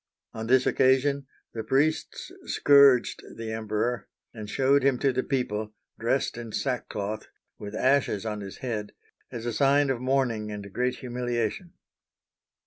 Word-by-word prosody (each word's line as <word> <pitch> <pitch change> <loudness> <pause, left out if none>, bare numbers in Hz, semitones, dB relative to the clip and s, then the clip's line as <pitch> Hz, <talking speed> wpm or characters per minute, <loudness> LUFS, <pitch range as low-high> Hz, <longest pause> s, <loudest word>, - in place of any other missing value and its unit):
On 110 0 -5
this 130 +1 +4
occasion 135 +1 +2 0.3
the 115 - -3
priests 140 +7 0
scourged 140 -3 +5
the 115 -1 -5
Emperor, 110 0 -2 0.3
and 110 -2 -8
showed 135 +4 +3
him 135 -1 +3
to 135 +1 +1
the 130 - +1
people, 110 -6 -2 0.2
dressed 120 +1 0
in 115 -2 -7
sackcloth, 110 -5 -3 0.3
with 105 0 -7
ashes 130 -5 +2
on 105 -1 -3
his 100 0 -8
head, 105 -4 -3 0.4
as 115 -1 -6
a 120 - -2
sign 140 +3 +3
of 125 -2 -3
mourning 125 -5 0
and 100 -2 -7
great 125 0 0
humiliation. 120 - -3
120 Hz, 140 wpm, -27 LUFS, 110-135 Hz, 0.4 s, scourged